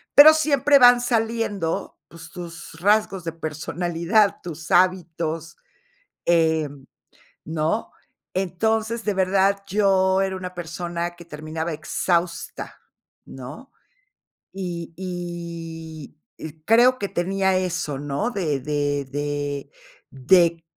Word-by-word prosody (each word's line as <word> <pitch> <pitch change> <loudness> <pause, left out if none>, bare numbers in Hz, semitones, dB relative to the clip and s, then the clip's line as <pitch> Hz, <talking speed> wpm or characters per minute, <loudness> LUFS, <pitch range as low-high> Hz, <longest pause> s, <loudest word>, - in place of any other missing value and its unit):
pero 300 +2 +11
siempre 290 -2 +4
van 245 -2 +7
saliendo, 225 -7 -1
pues, 165 0 -12
tus 170 -1 -9
tus 165 - -14
rasgos 205 -2 +2
de 165 - -3
personalidad, 165 +5 0
tus 160 -3 -8
hábitos, 170 -3 +1 0.7
em, 160 -5 +1 0.6
¿no? 160 +7 -2 0.4
Entonces, 220 +5 -1
de 210 - 0
verdad, 195 +1 +2
yo 195 -1 +3
era 190 -1 -1
una 180 -1 -6
persona 175 0 -4
que 170 - -12
terminaba 160 +1 -5
exhausta, 170 +2 -2 0.4
¿no? 135 - -10 0.8
Y 175 -3 -5
y 170 -4 -7 0.3
y 155 -2 -6
creo 240 +6 +5
que 200 - -3
tenía 190 +1 +1
eso, 170 -6 -2
¿no? 145 - -2
De 155 - -1
de 145 0 -1
de 145 -1 -3 0.4
de 165 +5 +3
175 Hz, 105 wpm, -23 LUFS, 160-195 Hz, 0.8 s, pero